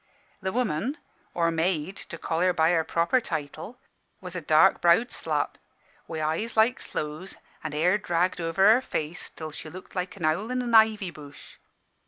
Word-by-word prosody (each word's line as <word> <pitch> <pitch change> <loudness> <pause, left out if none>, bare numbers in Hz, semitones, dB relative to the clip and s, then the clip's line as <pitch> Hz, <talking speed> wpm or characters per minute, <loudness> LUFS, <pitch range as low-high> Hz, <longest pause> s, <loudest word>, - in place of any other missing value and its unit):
"The 190 0 -2
woman 240 - -1 0.4
or 170 -1 +2
maid, 165 +2 -1
to 180 -4 -8
call 160 0 -2
her 180 +1 +3
by 160 0 +3
her 165 -2 +2
proper 170 +10 +1
title 160 - -5 0.4
was 180 -1 -8
a 180 - -3
dark 155 0 +4
browed 175 +8 +4
slut, - - -2 0.5
wi' 160 - -5
eyes 160 +10 -2
like 225 +3 +4
sloes, 155 +5 -5 0.3
an' 155 -2 -4
hair 180 +7 +2
dragged 175 -1 0
over 165 +4 +2
her 225 +4 +6
face 160 -8 -4
till 155 -1 -8
she 155 - -8
looked 185 +3 -11
like 185 +1 -3
an 175 - -3
owl 185 +9 0
in 255 0 -1
an 240 -1 -3
ivy 220 -4 +5
bush. 145 -2 -13
175 Hz, 180 wpm, -26 LUFS, 160-210 Hz, 0.5 s, her